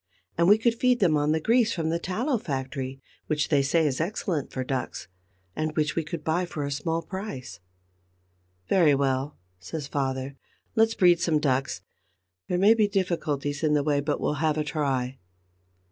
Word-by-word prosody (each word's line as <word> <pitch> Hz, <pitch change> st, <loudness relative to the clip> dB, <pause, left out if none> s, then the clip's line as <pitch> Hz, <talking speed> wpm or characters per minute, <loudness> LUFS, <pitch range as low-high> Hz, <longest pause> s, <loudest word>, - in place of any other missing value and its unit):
And 170 Hz, 0 st, +3 dB
we 205 Hz, +2 st, +7 dB
could 230 Hz, +1 st, +2 dB
feed 250 Hz, +1 st, +2 dB
them 170 Hz, -6 st, +3 dB
on 150 Hz, 0 st, +2 dB
the 160 Hz, -, +2 dB
grease 230 Hz, +5 st, +3 dB
from 160 Hz, -2 st, -1 dB
the 165 Hz, +1 st, 0 dB
tallow 230 Hz, -, -1 dB
factory, 135 Hz, -4 st, -4 dB, 0.3 s
which 150 Hz, -1 st, 0 dB
they 145 Hz, -3 st, +4 dB
say 160 Hz, +4 st, +2 dB
is 140 Hz, -1 st, 0 dB
excellent 170 Hz, -4 st, -2 dB
for 130 Hz, -, -3 dB
ducks, 130 Hz, -7 st, -4 dB, 0.5 s
and 155 Hz, 0 st, -2 dB
which 150 Hz, 0 st, +1 dB
we 165 Hz, -, 0 dB
could 155 Hz, 0 st, -6 dB
buy 160 Hz, +3 st, +1 dB
for 160 Hz, -5 st, -4 dB
a 140 Hz, -, -3 dB
small 165 Hz, +4 st, -2 dB
price." 160 Hz, -, -7 dB, 1.1 s
"Very 160 Hz, -, +4 dB
well," 135 Hz, +1 st, -1 dB, 0.2 s
says 140 Hz, -, -6 dB
father, 135 Hz, -1 st, -2 dB, 0.4 s
"let's 225 Hz, 0 st, +3 dB
breed 175 Hz, -2 st, +5 dB
some 165 Hz, -3 st, +2 dB
ducks. 135 Hz, -2 st, 0 dB, 0.7 s
There 180 Hz, -, 0 dB
may 200 Hz, +4 st, +6 dB
be 220 Hz, -2 st, +3 dB
difficulties 155 Hz, -7 st, -1 dB
in 155 Hz, -2 st, +2 dB
the 145 Hz, -, +2 dB
way; 145 Hz, -1 st, +1 dB
but 145 Hz, +1 st, -1 dB
we'll 150 Hz, -, -1 dB
have 155 Hz, -1 st, +1 dB
a 155 Hz, -, +1 dB
try." 135 Hz, -4 st, -2 dB
155 Hz, 180 wpm, -26 LUFS, 140-180 Hz, 1.1 s, we